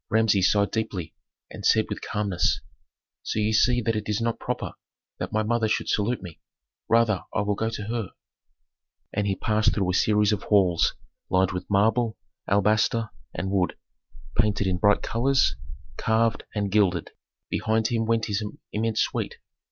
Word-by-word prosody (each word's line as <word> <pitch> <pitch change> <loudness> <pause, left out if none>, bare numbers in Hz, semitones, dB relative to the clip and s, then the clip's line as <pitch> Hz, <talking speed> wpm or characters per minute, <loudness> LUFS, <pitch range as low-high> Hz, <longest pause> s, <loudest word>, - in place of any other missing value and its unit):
" - - -64
Authentic. - - -3
Rameses 100 -4 +4
sighed 100 -2 +2
deeply 100 -8 -3 0.4
and - - -9
said - - +4
with - - -5
calmness, 100 -5 0 0.6
"So - - -4
ye 110 0 +1
see 120 +3 +4
that 115 0 0
it 105 0 -3
is 105 +1 0
not 115 0 -1
proper - - -3 0.5
that - - -4
my 110 0 +1
mother 115 0 +1
should 110 - -1
salute 110 +3 0
me. 85 -4 -10 0.5
Rather 115 -4 +3
I 110 - +2
will 105 0 0
go 110 +3 -1
to 110 -2 -5
her." 110 -2 -3 1.0
And 105 -1 0
he 95 - +1
passed 110 +1 +1
through 95 -3 +1
a - - -3
series 105 +2 +3
of 100 - -2
halls 95 -5 +3 0.3
lined 95 0 +2
with 90 0 -5
marble, 110 +3 +2 0.3
alabaster, 110 +2 +2 0.2
and 95 - -2
wood, 95 -3 0 0.6
painted 105 -2 +2
in 90 -2 0
bright 105 +1 +3
colors, 130 +4 +2 0.4
carved 110 -1 +1
and 100 -2 -1
gilded; 95 -5 +2 0.4
behind 110 0 +1
him 115 -2 0
went 115 -1 +1
his 105 0 -1 0.3
immense 110 +1 0
suite. - - -2
105 Hz, 170 wpm, -25 LUFS, 100-110 Hz, 1.0 s, Rameses